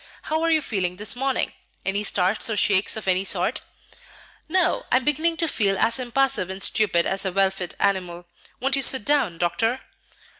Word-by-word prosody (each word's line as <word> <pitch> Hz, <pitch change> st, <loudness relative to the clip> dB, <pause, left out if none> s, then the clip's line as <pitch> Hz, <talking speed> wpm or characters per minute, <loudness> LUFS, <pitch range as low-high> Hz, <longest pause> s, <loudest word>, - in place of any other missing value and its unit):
"How 315 Hz, +1 st, -2 dB
are 330 Hz, -, +1 dB
you 315 Hz, -2 st, +2 dB
feeling 185 Hz, -7 st, -2 dB
this 210 Hz, +5 st, -2 dB
morning? 270 Hz, +1 st, -1 dB, 0.3 s
Any 200 Hz, +2 st, 0 dB
starts 195 Hz, +2 st, +1 dB
or 215 Hz, -, -2 dB
shakes 200 Hz, +1 st, +2 dB
of 215 Hz, -, -6 dB
any 185 Hz, 0 st, +2 dB
sort?" -, -, 0 dB, 0.9 s
"No; 360 Hz, 0 st, +1 dB
I -, -, +4 dB
am 255 Hz, -, +2 dB
beginning 320 Hz, +3 st, +1 dB
to 335 Hz, 0 st, 0 dB
feel 200 Hz, -8 st, +1 dB
as 230 Hz, +5 st, +1 dB
impassive 255 Hz, -6 st, 0 dB
and 190 Hz, +1 st, -3 dB
stupid 175 Hz, -6 st, +2 dB
as 195 Hz, -, 0 dB
a 190 Hz, -, -1 dB
well 195 Hz, +1 st, +2 dB
fed 185 Hz, -2 st, -6 dB
animal. 180 Hz, -3 st, -1 dB, 0.3 s
Won't 270 Hz, +2 st, +3 dB
you 275 Hz, -, 0 dB
sit 260 Hz, -4 st, +3 dB
down, 270 Hz, -, +1 dB
Doctor?" 225 Hz, +9 st, -1 dB
210 Hz, 190 wpm, -23 LUFS, 190-270 Hz, 0.9 s, I